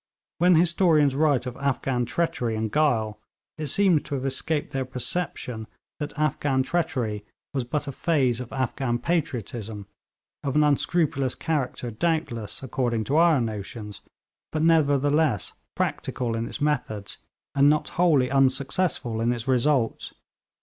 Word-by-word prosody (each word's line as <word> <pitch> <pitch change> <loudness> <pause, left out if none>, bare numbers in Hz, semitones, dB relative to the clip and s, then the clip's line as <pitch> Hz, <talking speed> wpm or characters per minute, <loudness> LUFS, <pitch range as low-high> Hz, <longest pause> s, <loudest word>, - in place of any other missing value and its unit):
When 180 +1 +5
historians 160 -4 +4
write 145 -3 +2
of 125 -1 -5
Afghan 135 -3 0
treachery 145 -8 -1
and 110 -1 -2
guile, 115 -9 +1 0.4
it 155 - -2
seems 180 0 +3
to 145 - -4
have 135 0 -3
escaped 145 +3 -1
their 135 0 0
perception 125 -3 -3 0.3
that 150 -2 -5
Afghan 145 -3 +1
treachery 130 -9 -1 0.3
was 130 -3 -1
but 145 +4 -2
a - - -2
phase 130 -5 +1
of 125 -2 -7
Afghan 130 -2 -1
patriotism, 120 - -3 0.6
of 140 -1 -2
an 150 - +5
unscrupulous 145 -2 +1
character, 135 -6 -2
doubtless, 120 -6 -1
according 120 -3 -1
to 140 +7 0
our 165 -3 +5
notions, 105 -2 -5 0.5
but 155 0 -1
nevertheless 145 - +3 0.2
practical 120 -3 -2
in 115 +1 -2
its - - -5
methods, 125 -9 -2 0.3
and 140 +1 +5
not 150 0 +1
wholly 150 -8 +3
unsuccessful 135 -2 +1
in 120 +1 +2
its 120 0 -3
results. 130 -2 +1
135 Hz, 135 wpm, -25 LUFS, 120-155 Hz, 0.6 s, When